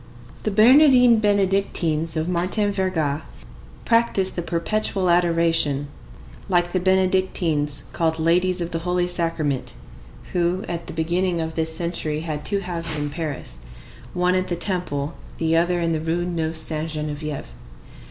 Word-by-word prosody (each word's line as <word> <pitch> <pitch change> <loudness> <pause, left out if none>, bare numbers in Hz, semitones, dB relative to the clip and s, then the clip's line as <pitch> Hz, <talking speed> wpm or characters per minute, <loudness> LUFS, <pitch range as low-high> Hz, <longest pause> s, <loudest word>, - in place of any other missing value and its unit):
The - - -1
Bernardines 245 +1 +6
Benedictines 190 -6 +1
of 160 +1 -1
Martin 185 +4 0
Verga 165 -7 -1 0.6
practise 230 -5 +3
the 175 - -3
Perpetual 180 +2 0
Adoration, 165 -5 +2 0.6
like 175 -1 +2
the 185 - +1
Benedictines 185 -6 +1
called 160 -1 0
Ladies 180 +3 +2
of 170 0 -3
the 165 - -1
Holy 180 +1 0
Sacrament, 165 -6 -2 0.6
who, 180 +3 0
at 170 -1 -5
the - - -6
beginning 170 +2 0
of 160 0 -3
this 160 0 -1
century, 165 -3 -2
had 155 -2 -4
two 200 +5 -1
houses 170 -4 -2
in 145 0 -2
Paris,—one 145 - -4
at 185 0 0
the 175 - -1
Temple, 170 -5 -2 0.2
the 165 0 +1
other 175 +1 +2
in 165 -1 0
the 155 - -1
Rue 165 +2 -1
Neuve 165 -2 -2
Sainte 160 0 -3
Geneviève. 150 -1 -4
170 Hz, 140 wpm, -22 LUFS, 160-185 Hz, 0.6 s, Bernardines